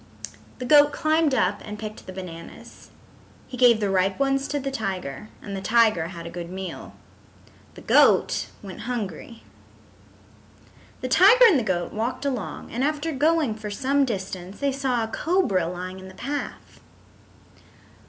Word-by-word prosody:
The 255 Hz, -, -5 dB
goat 290 Hz, +2 st, +6 dB
climbed 310 Hz, -1 st, +1 dB
up 230 Hz, -, +1 dB
and 210 Hz, 0 st, -7 dB
picked 215 Hz, 0 st, -8 dB
the -, -, -6 dB
bananas. 175 Hz, -3 st, -10 dB, 0.6 s
He -, -, -8 dB
gave 245 Hz, -3 st, +5 dB
the 205 Hz, -2 st, 0 dB
ripe 190 Hz, 0 st, +1 dB
ones 275 Hz, 0 st, +1 dB
to 290 Hz, -, -2 dB
the 275 Hz, 0 st, -4 dB
tiger 195 Hz, -, -4 dB
and 200 Hz, -1 st, -6 dB
the 190 Hz, -, -5 dB
tiger 215 Hz, -5 st, +3 dB
had 170 Hz, -2 st, -9 dB
a 170 Hz, -, -7 dB
good 175 Hz, -1 st, -7 dB
meal. 190 Hz, 0 st, -7 dB, 0.8 s
The -, -, -11 dB
goat -, -, +4 dB, 0.2 s
went 195 Hz, +4 st, -8 dB
hungry. 230 Hz, -, -5 dB, 1.6 s
The 255 Hz, -, -2 dB
tiger 395 Hz, -, +7 dB
and 375 Hz, -, +6 dB
the -, -, -2 dB
goat 175 Hz, -4 st, -2 dB
walked 245 Hz, +5 st, -3 dB
along 255 Hz, -8 st, -4 dB
and 245 Hz, +3 st, -2 dB
after 300 Hz, +2 st, -1 dB
going 305 Hz, -2 st, +2 dB
for 215 Hz, -1 st, -7 dB
some 275 Hz, +6 st, +1 dB
distance 190 Hz, -5 st, -5 dB
they 280 Hz, -1 st, +1 dB
saw 260 Hz, -3 st, -1 dB
a -, -, -3 dB
cobra 225 Hz, -, 0 dB
lying 180 Hz, +2 st, -6 dB
in 190 Hz, -, -11 dB
the 190 Hz, -, -13 dB
path. 280 Hz, +7 st, -6 dB
225 Hz, 160 wpm, -24 LUFS, 190-275 Hz, 1.6 s, tiger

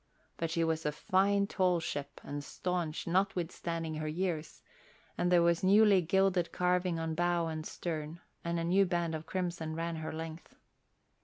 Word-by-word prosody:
But 165 Hz, -, -2 dB
she 165 Hz, +1 st, +1 dB
was 160 Hz, 0 st, 0 dB
a 150 Hz, -, 0 dB
fine 200 Hz, +6 st, +2 dB
tall 185 Hz, -3 st, +2 dB
ship 145 Hz, -3 st, -5 dB
and 145 Hz, 0 st, -5 dB
staunch 175 Hz, -1 st, -3 dB
notwithstanding 170 Hz, -3 st, -1 dB
her 155 Hz, 0 st, -3 dB
years, 165 Hz, -1 st, -3 dB, 0.5 s
and 175 Hz, 0 st, 0 dB
there 175 Hz, -1 st, +6 dB
was 170 Hz, 0 st, +2 dB
newly 200 Hz, 0 st, +6 dB
gilded 180 Hz, 0 st, +2 dB
carving 180 Hz, -1 st, +1 dB
on 165 Hz, 0 st, -2 dB
bow 175 Hz, 0 st, +1 dB
and 155 Hz, -1 st, -4 dB
stern 160 Hz, -1 st, -4 dB, 0.2 s
and 170 Hz, 0 st, -1 dB
a -, -, -1 dB
new 190 Hz, +4 st, +4 dB
band 170 Hz, -2 st, 0 dB
of 160 Hz, 0 st, -5 dB
crimson 170 Hz, -4 st, -3 dB
ran 165 Hz, 0 st, -2 dB
her 160 Hz, 0 st, -4 dB
length. 160 Hz, +1 st, -7 dB
170 Hz, 165 wpm, -32 LUFS, 160-180 Hz, 0.5 s, there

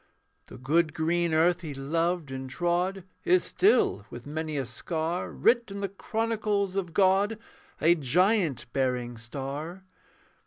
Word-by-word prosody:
The -, -, -11 dB
good 155 Hz, +5 st, +1 dB
green 170 Hz, +1 st, +1 dB
earth 170 Hz, +3 st, +3 dB
he 150 Hz, -5 st, -6 dB
loved 165 Hz, +2 st, -1 dB
and 130 Hz, 0 st, -5 dB
trod 175 Hz, +5 st, -1 dB, 0.2 s
Is 365 Hz, 0 st, +4 dB
still, 235 Hz, -, +2 dB
with 120 Hz, 0 st, -9 dB
many 155 Hz, +1 st, -3 dB
a 135 Hz, -, -1 dB
scar, 160 Hz, +8 st, -3 dB
Writ 235 Hz, -1 st, +2 dB
in 200 Hz, 0 st, -6 dB
the 200 Hz, -, -1 dB
chronicles 210 Hz, -1 st, -1 dB
of 185 Hz, -4 st, -2 dB
God, 195 Hz, +4 st, +3 dB, 0.4 s
A 165 Hz, +2 st, +5 dB
giant 165 Hz, -, +2 dB
bearing 125 Hz, -2 st, -1 dB
star. 140 Hz, +10 st, -6 dB
170 Hz, 140 wpm, -28 LUFS, 140-195 Hz, 0.4 s, A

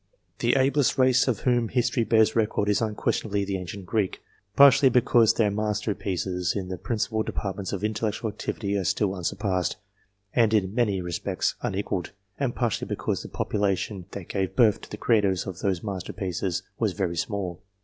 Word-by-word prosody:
The -, -, +2 dB
ablest 135 Hz, +1 st, +2 dB
race 130 Hz, -1 st, +4 dB
of 120 Hz, -6 st, 0 dB
whom 120 Hz, -3 st, +2 dB
history 120 Hz, -1 st, +1 dB
bears 110 Hz, -1 st, +3 dB
record 105 Hz, -2 st, +1 dB
is 105 Hz, -, +2 dB
un 110 Hz, -2 st, -1 dB
questionably 100 Hz, -1 st, -1 dB
the 95 Hz, -1 st, -2 dB
ancient 90 Hz, +1 st, -7 dB
Greek, 100 Hz, -1 st, -1 dB, 0.4 s
partly 140 Hz, -1 st, +7 dB
because 120 Hz, -2 st, +4 dB
their 105 Hz, -3 st, +2 dB
master 105 Hz, 0 st, -1 dB
pieces 90 Hz, -2 st, -2 dB
in 95 Hz, -3 st, -3 dB
the 95 Hz, -, -4 dB
principal 110 Hz, -1 st, -1 dB
departments 100 Hz, -2 st, -4 dB
of 100 Hz, 0 st, -4 dB
intellectual 110 Hz, 0 st, -1 dB
activity 100 Hz, -1 st, -3 dB
are 95 Hz, -, -1 dB
still 95 Hz, +3 st, +1 dB
unsurpassed, 90 Hz, -1 st, -1 dB, 0.6 s
and 115 Hz, -3 st, +3 dB
in 95 Hz, -2 st, +1 dB
many 105 Hz, -6 st, +1 dB
respects 90 Hz, -2 st, -2 dB
un -, -, -2 dB
equalled, 95 Hz, -3 st, -3 dB, 0.3 s
and 135 Hz, -4 st, -1 dB
partly 120 Hz, -5 st, -1 dB
because -, -, -2 dB
the -, -, -9 dB
population 100 Hz, -2 st, -1 dB
that 100 Hz, -4 st, -8 dB
gave 95 Hz, -2 st, -2 dB
birth 115 Hz, -5 st, +4 dB
\^> -, -, -29 dB
to -, -, -12 dB
the 105 Hz, -, -6 dB
creators 100 Hz, -5 st, +2 dB
of 95 Hz, -3 st, -6 dB
those 95 Hz, -4 st, -1 dB
master 95 Hz, -5 st, -4 dB
pieces 90 Hz, -2 st, -2 dB, 0.2 s
was -, -, +1 dB
very 90 Hz, -4 st, -2 dB
small. 90 Hz, 0 st, -3 dB
105 Hz, 180 wpm, -26 LUFS, 95-115 Hz, 0.6 s, partly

